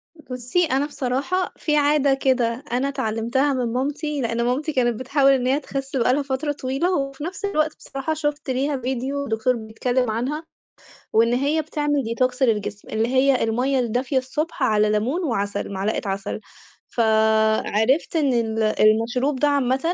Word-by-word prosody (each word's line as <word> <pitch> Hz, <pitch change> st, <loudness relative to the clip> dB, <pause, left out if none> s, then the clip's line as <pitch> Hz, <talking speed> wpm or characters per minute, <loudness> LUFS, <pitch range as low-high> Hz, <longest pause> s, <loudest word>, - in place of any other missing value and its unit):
بُصّي، 255 Hz, +3 st, -1 dB
أنا 275 Hz, -1 st, +1 dB
بصراحة 290 Hz, +7 st, -2 dB
في 300 Hz, -1 st, 0 dB
عادة 285 Hz, -1 st, +3 dB
كده، 255 Hz, -2 st, 0 dB
أنا 255 Hz, +3 st, +1 dB
اتعلمتها 235 Hz, +4 st, 0 dB
من 240 Hz, -3 st, -1 dB
مامتي، 290 Hz, +2 st, -2 dB
لإن 230 Hz, 0 st, -1 dB
مامتي 265 Hz, +6 st, -1 dB
كانت 240 Hz, -3 st, +1 dB
بتحاول 275 Hz, +1 st, +3 dB
إن 255 Hz, -2 st, +1 dB
هي 275 Hz, +3 st, +2 dB
تخس 275 Hz, -1 st, -5 dB
بقى 250 Hz, 0 st, +3 dB
لها 290 Hz, -, +1 dB
فترة 280 Hz, +2 st, -2 dB
طويلة، 285 Hz, +7 st, -1 dB
وفي 275 Hz, +1 st, -4 dB
نفس 370 Hz, +4 st, -4 dB
الوقت 310 Hz, -6 st, 0 dB
بصراحة 275 Hz, +4 st, -4 dB
شفت 295 Hz, -2 st, -3 dB
ليها 275 Hz, +3 st, 0 dB
فيديو 265 Hz, +3 st, -3 dB
دكتور 225 Hz, +2 st, +1 dB
بيتكلم 240 Hz, +2 st, -1 dB
عنها، 265 Hz, +8 st, -2 dB, 0.7 s
وإن 230 Hz, +2 st, +4 dB
هي 285 Hz, +5 st, +1 dB
بتعمل 295 Hz, -2 st, -1 dB
ديتوكس 250 Hz, +3 st, 0 dB
للجسم، 210 Hz, -4 st, -1 dB
اللي 220 Hz, +1 st, 0 dB
هي 260 Hz, +1 st, +3 dB
المَيّة 250 Hz, +4 st, +1 dB
الدافية 250 Hz, +3 st, 0 dB
الصبح 280 Hz, +3 st, -2 dB
على 215 Hz, -3 st, +3 dB
لَمون 235 Hz, -, 0 dB
وعسل، 205 Hz, -7 st, -2 dB
معلقة 195 Hz, +3 st, -1 dB
عسل. 195 Hz, +2 st, -3 dB, 0.5 s
فعرفت 220 Hz, +4 st, +2 dB
إن 290 Hz, -5 st, +2 dB
ال 225 Hz, -2 st, 0 dB
المشروب 230 Hz, +6 st, +2 dB
ده 295 Hz, -, +3 dB
عامةً 270 Hz, -2 st, +2 dB
260 Hz, 155 wpm, -22 LUFS, 230-285 Hz, 0.7 s, وإن